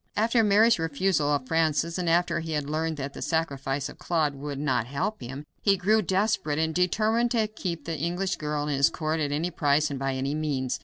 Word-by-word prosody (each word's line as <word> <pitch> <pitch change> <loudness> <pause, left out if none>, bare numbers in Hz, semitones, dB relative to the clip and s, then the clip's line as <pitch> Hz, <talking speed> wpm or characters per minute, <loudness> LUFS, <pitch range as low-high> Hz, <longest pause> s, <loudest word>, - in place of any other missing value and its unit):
After 225 +2 +3
Mary's 215 +1 +5
refusal 165 0 +1
of 145 -3 0
Francis, 165 +2 +1
and 175 -2 0
after 175 +1 +2
he 160 -1 -4
had 150 -2 -1
learned 160 +1 -2
that 140 0 -5
the - - -8
sacrifice 140 -3 -1
of - - -12
Claude 160 -4 0
would 140 0 -6
not 135 -5 0
help 140 - -3
him, 135 +4 -7 0.2
he 200 -2 +3
grew 215 +4 +3
desperate, 190 -5 0
and 160 0 0
determined 215 +7 +2
to 230 -2 +2
keep 190 -6 -5
the 165 -3 -3
English 175 +4 -1
girl 150 -1 -2
in 145 - 0
his 140 0 +4
court 155 -1 -2
at 145 -2 -1
any 160 +5 -1
price 150 -2 +2
and 140 - -4
by 135 0 -1
any 135 +2 -2
means. 145 -4 -2
160 Hz, 215 wpm, -27 LUFS, 145-180 Hz, 0.2 s, Mary's